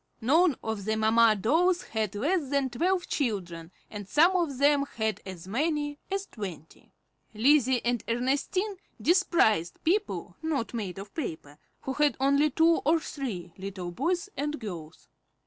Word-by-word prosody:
None 310 +6 +3
of 220 -3 -3
the 220 0 0
mamma 220 0 +4
dolls 345 - +2
had 215 -2 -3
less 290 - 0
than 275 -2 0
twelve 355 +8 0
children, 180 - -3 0.2
and 205 -2 -8
some 335 +5 +4
of 330 -7 0
them 285 +1 +4
had 220 -1 -1
as 185 -2 -8
many 290 +5 -1
as 390 0 -2
twenty. 185 - -9 0.4
Lizzie 260 +1 +3
and 240 -1 0
Ernestine 280 - -1 0.2
despised 330 - +2
people 400 +6 -1
not 305 -8 -2
made 200 -6 -4
of 200 +1 -9
paper, 155 - -6 0.2
who 265 - -3
had 295 -2 +2
only 280 +3 +3
two 325 +4 +3
or 325 +3 +3
three 200 - -6
little 190 -2 -5
boys 345 - -1
and 295 +2 -3
girls. 170 -8 -8
260 Hz, 145 wpm, -28 LUFS, 210-315 Hz, 0.4 s, mamma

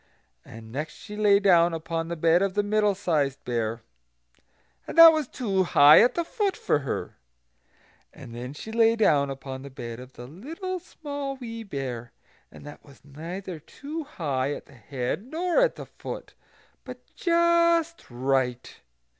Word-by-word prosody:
And 110 0 -12
next 150 +6 -4
she 210 -1 -10
lay 205 -1 +4
down 175 -4 +4
upon 165 0 -4
the 170 - -4
bed 165 +2 +3
of 195 -1 -1
the 205 - +2
Middle 210 -1 +1
sized 150 -8 -1
Bear, 115 -1 -2 1.0
and - - -7
that 330 -1 +11
was 310 -4 -1
too 200 -8 -1
high 150 -4 +7
at 240 - +3
the 340 - 0
foot 405 0 -1
for - - +1
her. 140 - -5 0.9
And 115 - -12
then 125 +3 -7
she 220 - -8
lay 225 0 +4
down 145 -11 +3
upon 135 -1 -7
the 140 - -9
bed 120 -3 -8
of 130 +1 -12
the 120 - -10
Little 325 - -6
Small 285 -5 -6
Wee 230 -3 -7
Bear; 130 - -6 0.4
and - - -14
that 145 - -11
was 140 -1 -19
neither 170 +5 -7
too 300 - -7
high 145 - -2
at - - -10
the - - -19
head 125 - -4
nor 335 - 0
at - - +2
the - - -8
foot, - - -9 0.5
but - - -11
just 340 -1 +2
right. 125 0 -1
170 Hz, 165 wpm, -26 LUFS, -, 1.0 s, that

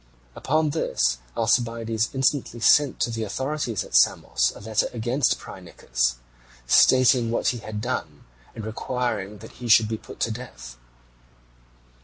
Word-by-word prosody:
Upon 155 +2 0
this 60 - 0 0.2
Alcibiades 115 -1 0
instantly 135 -2 -1
sent 145 +5 +4
to 120 - +1
the 115 -1 -3
authorities 130 0 -3
at - - -14
Samos - - +3
a - - -11
letter 110 +1 0
against 120 +3 0
Phrynichus, - - -3 0.5
stating 125 - +5
what 115 - +1
he 120 - -3
had 105 -1 -6
done, - - -4 0.3
and 110 - -7
requiring 110 -3 -3
that - - -12
he 120 - -4
should 110 0 +6
be 110 0 -3
put - - -13
to 115 - +1
death. 65 - -9
115 Hz, 140 wpm, -24 LUFS, 110-125 Hz, 0.5 s, should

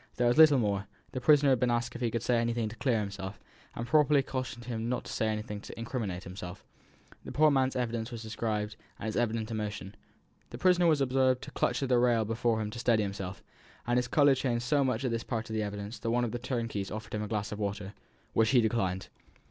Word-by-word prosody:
There 125 - +1
was 120 - +3
little 155 -3 +8
more: 100 -4 0 0.2
the 130 - -4
prisoner 145 +1 +5
had 130 - +3
been 125 - +2
asked 120 0 0
if 120 - -6
he 120 - +1
could 115 0 -2
say 120 -1 +2
anything 115 -1 0
to 110 - -9
clear 120 -3 +1
himself, 100 -1 -5 0.4
and 115 - -3
properly 150 0 +4
cautioned 130 -3 -5 0.2
not 125 - -1
to - - -8
say 110 - 0
anything 105 -1 -3
to - - -10
incriminate 115 -6 -3
himself. 90 0 -8 0.6
The - - -7
poor 155 - +3
old 150 - +6
man's 130 -1 +2
person 120 -2 -1
was 115 -1 -6
described, 105 -1 -3 0.2
and - - -7
his 110 - -2
evident 115 -1 0
emotion. 105 -3 -4 0.6
"The - - -7
prisoner 180 -1 +4
was 155 -3 +3
observed 130 -1 +2
to - - -8
clutch 125 +3 0
at 135 - -2
the 125 -2 +4
rail 120 -2 +3
before 115 +1 0
him 105 -1 -3
to 115 - -7
steady 115 -2 +3
himself, 100 -1 -5 0.4
and 120 +1 +1
his 125 - -2
colour 145 +2 +5
changed 125 -3 -1
so 140 +2 +3
much 130 -1 0
at 125 - 0
this 115 0 -2
part 115 -2 -4
of - - -3
the 110 - 0
evidence 105 +1 -5
that 115 - -3
one 120 +1 +2
of 115 - -3
the 120 - -3
turnkeys 115 -6 -3
offered 110 +1 -7
him 105 - -1
a 105 - -3
glass 105 -1 -2
of 105 - -5
water, 100 -1 -3 0.4
which 110 -1 +3
he 130 -2 +5
declined. 95 -5 0
115 Hz, 240 wpm, -30 LUFS, 105-125 Hz, 0.6 s, little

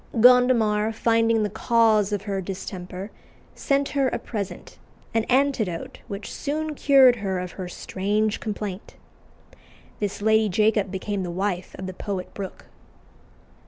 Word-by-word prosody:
Gondomar, 230 -3 +5
finding 225 0 +2
the 210 - 0
cause 220 -3 +3
of 205 -1 -2
her 200 -2 -2
distemper, 185 +1 -6 0.4
sent 280 0 0
her 275 -2 +1
a - - -1
present, 205 -4 -6 0.3
an 225 -1 +1
antidote 250 -10 0
which 200 -2 -6
soon 305 +1 -3
cured 270 -4 +6
her 195 -3 -2
of 180 -1 -4
her 185 -2 -6
strange 205 +4 -1
complaint. 205 -2 -5 1.0
This 205 -1 -2
Lady 220 0 +3
Jacob 210 +1 +2
became 195 +1 -3
the 180 - -3
wife 185 +1 -3
of 190 - -6
the 185 - -5
poet 190 -1 -5
Brooke. 195 -2 -7
210 Hz, 135 wpm, -24 LUFS, 190-230 Hz, 1.0 s, cured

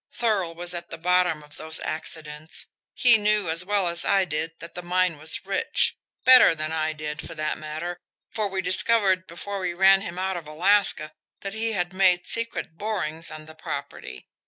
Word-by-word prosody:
Thurl 195 -8 0
was 175 +1 -1
at 170 0 -5
the - - -7
bottom 175 -2 +1
of 150 0 -14
those 160 0 -3
accidents. 155 -1 -4 0.3
He 240 -3 +6
knew 210 -4 +1
as 165 +3 +3
well 200 -1 +1
as 170 0 0
I 195 -1 +3
did 160 0 -3
that 165 0 -9
the 180 - -6
mine 180 -2 0
was 160 +4 -3
rich 195 0 0 0.3
better 255 -9 +8
than 155 0 -4
I 155 -1 -1
did, 150 0 -6
for - - -9
that 155 -1 -2
matter, 160 +3 -5 0.3
for 215 -2 -1
we 190 -1 -3
discovered 185 0 +3
before 200 +4 -6
we 180 -2 -3
ran 195 +1 +5
him 175 -2 -6
out 190 0 -1
of 165 -3 -9
Alaska 175 -1 +2 0.3
that 195 0 -5
he 225 +1 -1
had 175 -2 -2
made 185 -2 +3
secret 230 -7 -3
borings 170 -7 -1
on 155 0 -8
the 160 - -12
property. 155 - -7
175 Hz, 190 wpm, -25 LUFS, 160-195 Hz, 0.3 s, better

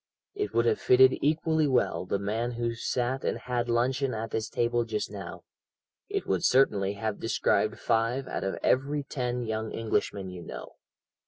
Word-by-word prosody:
It 410 0 -2
would - - +3
have 440 -2 +2
fitted 395 0 +6
equally 155 +1 +2
well 125 -7 +1
the 100 - 0
man 110 +5 -2
who 120 0 -1
sat 125 +3 -2
and - - 0
had 120 -1 -2
luncheon 125 +2 +1
at 110 +1 -4
this 110 0 -2
table 120 0 +1
just 110 -3 -3
now; 100 -3 -8 0.7
it - - -2
would 95 -2 0
certainly 100 -7 +3
have 105 +1 -3
described 110 -1 +1
five 120 +4 0
out - - -3
of 95 - -2
every 140 +3 +1
ten 125 -3 -3
young 110 0 -3
Englishmen 100 -4 -2
you 90 -1 -8
know. - - -8
120 Hz, 170 wpm, -28 LUFS, 110-135 Hz, 0.7 s, fitted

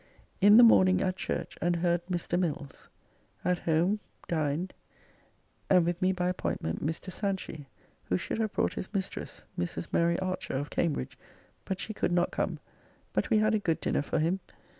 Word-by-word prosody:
In 205 +2 +8
the 240 - +10
morning 185 -5 +6
at 185 -1 0
church 190 - -3
and 175 0 +2
heard 175 0 +1
Mr. 175 -1 -1
Mills. 150 -6 -4 0.6
At 180 -1 +2
home 170 +6 +2 0.3
dined 160 +2 -1 1.0
and 180 -3 +5
with 175 +2 -1
me 185 0 +4
by 180 -1 -1
appointment 130 - -2
Mr. 165 +5 -3
Sanchy, 190 -7 -3 0.4
who 90 - +1
should 220 - -3
have 220 -2 0
brought - - +1
his - - -5
mistress, 190 -1 -3 0.2
Mrs. 85 -1 -3
Mary 170 0 +2
Archer, 185 -5 -3
of 145 +2 -3
Cambridge, 155 - -1 0.5
but 190 -1 -3
she 220 - -4
could 190 - -1
not 175 0 +2
come, - - -1 0.6
but - - 0
we 220 - +4
had 215 +1 +3
a 215 - +3
good 165 -5 0
dinner - - 0
for 145 - -2
him. 165 +5 +1
180 Hz, 175 wpm, -30 LUFS, 165-190 Hz, 1.0 s, the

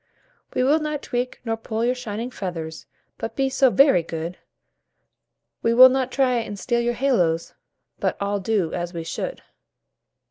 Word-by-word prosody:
"We 255 - +2
will 290 +5 +4
not 300 -1 -3
tweak 245 0 -3
nor 225 -1 0
pull 225 0 -3
your 250 - +2
shining 235 -1 -5
feathers, 165 -7 -6 0.3
But 225 0 -5
be 270 0 +1
so 265 0 +4
very 270 - +5
good; 165 +2 -6 1.2
We 230 0 +2
will 255 +1 +10
not 260 0 0
try 255 -2 +2
and 215 -3 -4
steal 235 +5 0
your 240 0 0
little 270 +4 0
halos, 165 -1 0 0.5
But - - -1
all 200 0 -1
do 190 -4 0
as 175 0 -4
we 165 - -3
should." 175 - -5
230 Hz, 170 wpm, -23 LUFS, 180-255 Hz, 1.2 s, will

